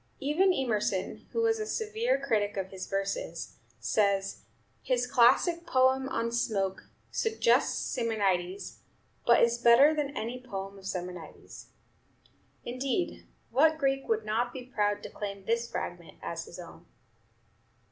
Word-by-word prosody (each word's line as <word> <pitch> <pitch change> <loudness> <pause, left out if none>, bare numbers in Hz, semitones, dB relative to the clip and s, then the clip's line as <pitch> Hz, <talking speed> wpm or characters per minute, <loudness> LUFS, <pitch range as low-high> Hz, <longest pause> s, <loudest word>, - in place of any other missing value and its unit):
Even 315 +8 +3
Emerson, 215 - -1
who 460 - 0
was 450 -1 +2
a 430 - -2
severe 445 +3 0
critic 205 -2 0
of 190 -1 -2
his 190 -1 -6
verses, 195 - -3 0.2
says, 200 -2 +1 0.4
"His 250 -1 +1
classic 260 +8 +4
poem 260 +1 +3
on 230 -2 -1
'Smoke' 200 -5 -1 0.2
suggests 450 +1 +2 0.2
Simonides, 200 -6 -1 0.5
but 235 - +6
is 235 0 +2
better 240 +6 +7
than 295 -2 -1
any 240 +3 -4
poem 195 -5 -6
of 190 - -9
Simonides." 180 -4 -7 1.0
Indeed, 260 +8 -2 0.2
what 310 +6 +4
Greek 270 -2 0
would 450 -1 +1
not 235 +3 0
be 255 -1 -8
proud 205 -5 0
to - - -6
claim 200 -2 -6
this 235 +2 0
fragment - - -6
as - - -4
his - - -11
own? - - -11
235 Hz, 135 wpm, -29 LUFS, 200-280 Hz, 1.0 s, better